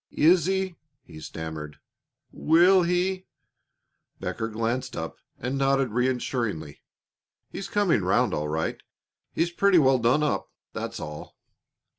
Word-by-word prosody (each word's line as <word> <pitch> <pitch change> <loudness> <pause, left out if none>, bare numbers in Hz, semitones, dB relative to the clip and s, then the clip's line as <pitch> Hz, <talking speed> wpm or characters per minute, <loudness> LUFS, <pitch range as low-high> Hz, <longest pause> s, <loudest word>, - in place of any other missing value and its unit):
"Is 170 +1 +4
he 190 -2 -1
" - - -56
he 80 -2 -12
stammered, 80 -2 -7 0.5
"will 175 +4 +5
he 180 +2 0 0.5
" - - -50
Becker 115 - -3
glanced 115 +3 -2
up 80 0 -5 0.2
and 130 +3 -3
nodded 135 -1 +2
reassuringly. 120 - -2 0.7
"He's 195 - -6
coming 200 - +2
round 90 +1 +2
all 75 0 -1
right. 80 +1 -2 0.5
He's 170 +1 0
pretty 195 +1 +4
well 135 -4 +4
done 120 +6 +3
up, 150 - -1 0.2
that's - - -5
all." 75 0 -8
130 Hz, 130 wpm, -26 LUFS, -, 0.7 s, will